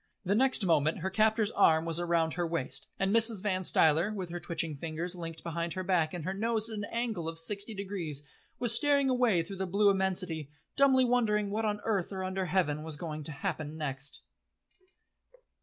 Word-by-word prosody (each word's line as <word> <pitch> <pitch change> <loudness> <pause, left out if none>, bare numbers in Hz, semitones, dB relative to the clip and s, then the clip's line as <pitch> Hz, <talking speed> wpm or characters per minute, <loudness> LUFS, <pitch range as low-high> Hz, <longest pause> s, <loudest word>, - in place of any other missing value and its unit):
The 190 - +2
next 255 -2 +4
moment 155 -3 +2
her 190 +2 -2
captor's 220 +1 +2
arm 160 -5 +4
was 165 +1 -1
round 170 -2 +1
her 175 -1 -1
waist, 140 -5 -2
and 195 +2 +1
Mrs. 225 -3 +4
Van 190 -3 0
Stuyler, 165 +3 +3
with 190 -4 -5
her 175 - -4
twitching 165 -3 -2
fingers 165 +4 -4
linked 165 -2 -7
behind 170 0 -3
her 185 - -4
back, 175 -4 +1
and 165 -3 -5
her 190 - -2
nose 220 +2 0
at 220 - -5
an 205 - -3
angle 225 -8 -2
of 165 - -6
sixty 200 +6 -1
degrees, 185 -8 -3 0.3
was 240 -2 +2
staring 280 +1 +3
away 240 -9 +2
through 195 +4 -8
the 190 0 -2
blue 200 +2 +4
immensity, 185 -6 -1 0.3
dumbly 265 -2 +5
wondering 210 -4 +1
what 220 +2 -1
on 210 -1 -1
earth 200 -5 -1
or 190 -1 -4
under 185 0 -2
heaven 150 -4 0
was 155 -1 -4
going 155 -1 -5
to 160 - -1
happen 155 -2 -4
next. 140 -2 -5
185 Hz, 195 wpm, -30 LUFS, 165-210 Hz, 0.3 s, dumbly